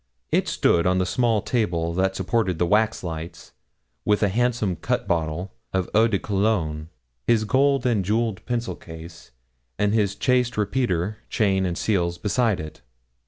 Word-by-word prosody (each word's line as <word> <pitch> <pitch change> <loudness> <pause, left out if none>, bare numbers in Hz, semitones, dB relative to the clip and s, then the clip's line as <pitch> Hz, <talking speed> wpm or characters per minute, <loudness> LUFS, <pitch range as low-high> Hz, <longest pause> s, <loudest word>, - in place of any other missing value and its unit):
It - - +2
stood 85 +1 +2
on 90 0 +2
the 95 - +1
small 115 +1 +1
table 85 -8 0
that 95 +2 +1
supported 95 -1 0
the 85 - +2
waxlights, 85 -5 -1 0.5
with 105 0 +2
a 100 - +3
handsome 115 -4 0
cut 125 +7 -2
bottle 85 +1 -1 0.2
of 95 -2 0
eau 110 +2 +5
de 110 -4 +1
cologne, 95 -7 -1 0.4
his 115 -2 +3
gold 135 +3 +2
and 115 -6 +2
jewelled 110 +1 -1
pencil 120 -1 -2
case, 80 0 -11 0.5
and 105 0 +1
his 100 -3 +1
chased 125 +1 +1
repeater, 105 -3 0
chain, 95 -4 +1
and 85 -1 -3
seals, 85 -5 0
beside 110 -1 +1
it. 75 0 -8
100 Hz, 155 wpm, -24 LUFS, 90-115 Hz, 0.5 s, eau